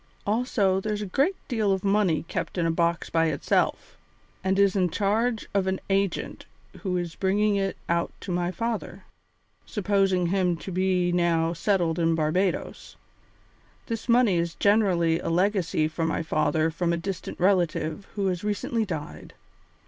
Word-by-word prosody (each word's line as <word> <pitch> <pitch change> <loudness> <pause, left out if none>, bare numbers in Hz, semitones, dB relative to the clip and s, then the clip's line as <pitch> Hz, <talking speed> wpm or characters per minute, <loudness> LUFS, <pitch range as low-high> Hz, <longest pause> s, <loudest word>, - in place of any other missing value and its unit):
Also, 205 -3 +1
there's 210 0 -2
a - - -3
great 275 - +1
deal 220 -5 +1
of 190 -1 0
money 195 -5 +2
kept 165 - -4
in 170 - +1
a 165 - +2
box 170 0 0
by 165 0 +3
itself, 155 - -1 0.4
and 190 0 +1
is 200 -1 +4
in 185 -2 +2
charge 215 +5 0
of 195 -1 +1
an 190 0 0
agent 195 -1 -1 0.3
who 185 -3 -1
is 175 -2 -3
bringing 205 +3 +1
it 195 -1 -1
out 170 0 0
to 190 - -6
my 175 0 0
father, 230 +3 -4 0.6
supposing 195 -3 +1
him 180 -1 +1
to 190 - -7
be 185 -1 +1
now 170 -1 +1
settled 175 -2 0
in 165 -1 +2
Barbadoes. 165 +4 -1 0.9
This 230 0 -5
money 235 -6 +4
is 170 0 -1
generally 185 -6 +3
a - - -3
legacy 175 -3 +1
for 160 +1 -4
my 165 0 0
father 160 +1 +1
from 170 +1 -1
a 170 - 0
distant 185 +1 -5
relative 175 -2 +1
who 200 -2 -1
has 180 -1 -1
recently 215 +2 -1
died. 160 -6 -7
185 Hz, 160 wpm, -26 LUFS, 170-200 Hz, 0.9 s, is